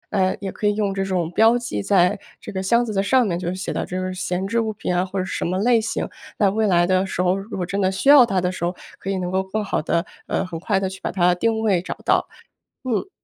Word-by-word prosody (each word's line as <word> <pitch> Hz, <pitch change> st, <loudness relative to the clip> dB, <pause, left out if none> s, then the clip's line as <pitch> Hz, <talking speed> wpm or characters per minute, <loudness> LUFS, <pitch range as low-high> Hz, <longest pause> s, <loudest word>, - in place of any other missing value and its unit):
嗯， 190 Hz, -1 st, +2 dB
也 195 Hz, -, -3 dB
可 210 Hz, -, -2 dB
以 205 Hz, -, +2 dB
用 205 Hz, -2 st, 0 dB
这 195 Hz, -, -1 dB
种 180 Hz, -3 st, -1 dB
标 225 Hz, +5 st, +5 dB
记 170 Hz, -, -3 dB
在 190 Hz, -, +3 dB, 0.2 s
这 -, -, -8 dB
个 190 Hz, -1 st, -3 dB
箱 235 Hz, +5 st, +2 dB
子 215 Hz, -, -4 dB
的 195 Hz, -, +1 dB
上 250 Hz, +5 st, +3 dB
面 175 Hz, -4 st, -1 dB
就 175 Hz, -1 st, -2 dB
写 185 Hz, -, -4 dB
到 -, -, -2 dB
这 185 Hz, +1 st, -4 dB
个 185 Hz, 0 st, -3 dB
闲 185 Hz, 0 st, -2 dB
置 230 Hz, +3 st, 0 dB
物 220 Hz, -1 st, 0 dB
品 180 Hz, -3 st, -3 dB
啊， 180 Hz, -, +2 dB
或 190 Hz, +1 st, -5 dB
者 185 Hz, -, 0 dB
什 -, -, -3 dB
么 180 Hz, +2 st, -1 dB
类 230 Hz, +2 st, +3 dB
型。 220 Hz, -, -2 dB, 0.3 s
那 200 Hz, -2 st, +3 dB
未 215 Hz, +1 st, +1 dB
来 175 Hz, -2 st, +4 dB
的 185 Hz, +1 st, +2 dB
时 180 Hz, -, -6 dB
候， 180 Hz, +1 st, +2 dB
如 195 Hz, +1 st, -6 dB
果 180 Hz, -, -1 dB
真 195 Hz, +3 st, -2 dB
的 190 Hz, 0 st, +2 dB
需 230 Hz, +9 st, 0 dB
要 285 Hz, -3 st, +10 dB
它 195 Hz, -5 st, +1 dB
的 180 Hz, 0 st, 0 dB
时 185 Hz, -, -7 dB
候， 175 Hz, +1 st, -1 dB, 0.2 s
可 195 Hz, -, -6 dB
以 195 Hz, -, 0 dB
能 180 Hz, 0 st, -3 dB
够 190 Hz, 0 st, +1 dB
更 205 Hz, +3 st, -3 dB
好 195 Hz, -, -1 dB
地， 170 Hz, +2 st, 0 dB, 0.2 s
呃， -, -, -1 dB
很 170 Hz, -3 st, -6 dB
快 195 Hz, +1 st, 0 dB
地 190 Hz, -, -1 dB
去 190 Hz, 0 st, -8 dB
把 -, -, -2 dB
它 180 Hz, -1 st, +3 dB
定 220 Hz, +4 st, 0 dB
位 195 Hz, -6 st, +2 dB
找 -, -, -5 dB
到。 -, -, +2 dB, 0.6 s
嗯。 255 Hz, -, -1 dB
190 Hz, 310 characters per minute, -22 LUFS, 180-215 Hz, 0.6 s, 要